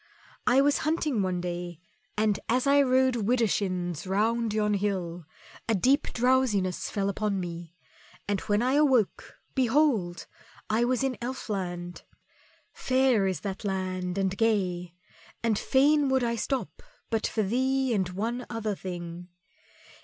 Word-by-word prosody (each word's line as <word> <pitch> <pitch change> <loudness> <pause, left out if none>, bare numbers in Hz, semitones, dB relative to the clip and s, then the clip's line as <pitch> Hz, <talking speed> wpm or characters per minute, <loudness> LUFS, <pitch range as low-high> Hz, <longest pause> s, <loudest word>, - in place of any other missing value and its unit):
"I 260 +2 +5
was 285 +1 +3
hunting 305 -7 0
one 185 -2 -1
day, 175 -1 -5 0.4
and 215 -1 +2
as 250 +3 +2
I 280 +1 +5
rode 260 -1 +3
widershins 195 -7 0
round 225 +4 +1
yon 210 0 +1
hill, 180 -5 -2 0.4
a 225 - +3
deep 265 - +2
drowsiness 240 -7 +1
fell 200 -1 -1
upon 200 0 -1
me, 170 -1 -6 0.5
and 205 -1 0
when 210 +2 +1
I 255 +2 +2
awoke, 270 -8 +2 0.2
behold! 245 - +1 0.5
I 230 +2 +3
was 255 +1 0
in 265 -2 -1
Elfland. 185 -8 -4 0.7
Fair 255 -6 +2
is 185 -6 -2
that 195 +1 -5
land 185 -2 -2
and 190 -1 0
gay, 180 -6 0 0.5
and 225 -3 +1
fain 285 +1 +3
would 265 -1 +2
I 235 0 0
stop 265 +3 -3 0.3
but 225 -1 +1
for 220 - -1
thee 260 +4 +1
and 190 -4 0
one 230 +7 -3
other 220 -2 -2
thing. 175 -2 -7
215 Hz, 140 wpm, -28 LUFS, 185-255 Hz, 0.7 s, I